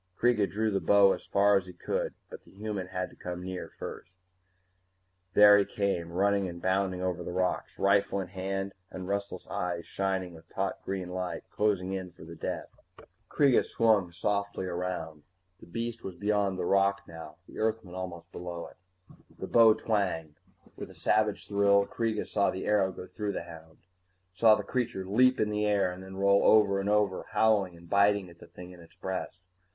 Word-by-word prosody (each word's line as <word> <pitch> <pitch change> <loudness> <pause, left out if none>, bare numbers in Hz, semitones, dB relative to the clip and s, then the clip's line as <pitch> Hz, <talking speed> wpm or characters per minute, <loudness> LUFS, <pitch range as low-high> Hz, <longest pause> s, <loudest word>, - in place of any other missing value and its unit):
Kreega 115 -5 +2
drew 110 +2 0
the 100 - +1
bow 100 -1 +5
as - - -8
far 100 0 +4
as 95 -1 -3
he 90 - -9
could. 85 - -3 0.2
But - - -9
the - - -21
human 100 -2 -5
had 90 0 -4
to - - -17
come 90 0 -6
near 95 -1 -5
first 90 - -8 1.2
There 105 0 +8
he - - +4
came, 95 -5 -2
running 100 +1 +1
and 85 0 -8
bounding 95 0 0
over 90 -1 -2
the 85 - -5
rocks, 90 +1 -1
rifle 100 0 +2
in 95 -2 -5
hand 95 +1 -3 0.2
and 95 -1 -7
restless 100 0 -3
eyes 85 -1 -3
shining 95 -2 -2
with 80 - -15
taut - - -3
green 95 -2 -4
light, 90 0 -4
closing 95 -3 0
in 95 -2 -5
for - - -14
the 85 +1 -10
death. 80 - -5 0.6
Kreega 140 -4 +4
swung 105 -6 +2
softly 100 +2 -2
around. 85 -4 -4 0.4
The - - -15
beast 115 +5 -4
was 95 - -6
beyond 100 -2 0
the 90 - -2
rock 100 +1 +2
now, 80 -2 -10
the - - -10
Earthman 110 -4 -1
almost 90 -2 -7
below 85 -1 -6
it. - - -23 0.6
The - - -5
bow 115 -2 +6
twanged. 90 -8 -2 0.4
With - - -8
a - - -14
savage 105 -1 +1
thrill, 100 0 +3
Kreega 115 -1 -2
saw 100 -1 +1
the 95 - -4
arrow 100 -3 +2
go 90 - -9
through 105 +1 -4
the - - -4
hound, 80 -1 -14 0.5
saw 110 +3 +6
the 105 - -4
creature 120 -3 -2
leap 130 +7 +3
in 105 0 +1
the 105 0 0
air 100 -3 +2
and 90 +1 -9
then 95 0 -10
roll 100 0 +4
over 100 -2 +5
and 100 +1 -1
over, 105 -3 +1
howling 100 -6 +2
and 85 0 -15
biting 100 -1 +3
at 85 - -18
the - - -13
thing 90 0 -11
in 90 - -13
its 85 -1 -17
breast. 95 -1 -5
95 Hz, 190 wpm, -29 LUFS, 90-105 Hz, 1.2 s, There